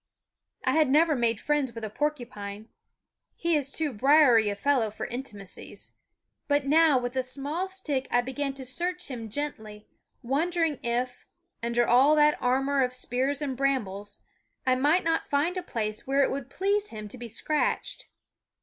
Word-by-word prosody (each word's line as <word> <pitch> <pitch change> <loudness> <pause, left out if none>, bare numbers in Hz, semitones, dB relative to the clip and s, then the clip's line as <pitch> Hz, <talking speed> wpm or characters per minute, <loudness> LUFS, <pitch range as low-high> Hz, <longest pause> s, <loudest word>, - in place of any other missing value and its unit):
I - - +3
had 310 -3 +3
never 310 +2 +4
made 235 -4 +1
friends 295 -5 0
with 230 - -7
a 215 - -3
porcupine, 225 -7 -4 0.7
he 335 -1 +1
is 285 -2 0
too 300 -1 -2
briery 250 -3 +5
a 205 - -2
fellow 250 0 +1
for 210 - -6
intimacies, 225 -6 -8 0.6
but 285 -1 +2
now 310 0 +5
with 245 0 -3
a 260 - +2
small 280 +8 -3
stick 310 -9 -2
I 245 - +3
began 270 +2 -3
to 265 -1 -7
search 350 +5 -3
him 230 -3 -6
gently, 215 -5 -5 0.4
wondering 320 +3 0
if, 245 +1 -2 0.3
under 235 +1 +1
all 270 +5 +6
that 300 0 +4
armor 270 +2 +2
of 250 0 -1
spears 260 +3 -1
and 270 -3 -2
brambles, 220 -7 -2 0.4
I 255 - +4
might 295 +8 +3
not 325 0 0
find 295 +6 +1
a 365 - -2
place 215 -10 -4
where 275 +1 +3
it - - +1
would 270 -1 -4
please 405 +6 0
him 215 -1 -7
to 255 - -8
be 240 - -6
scratched. 295 +7 -2
270 Hz, 165 wpm, -27 LUFS, 240-295 Hz, 0.7 s, all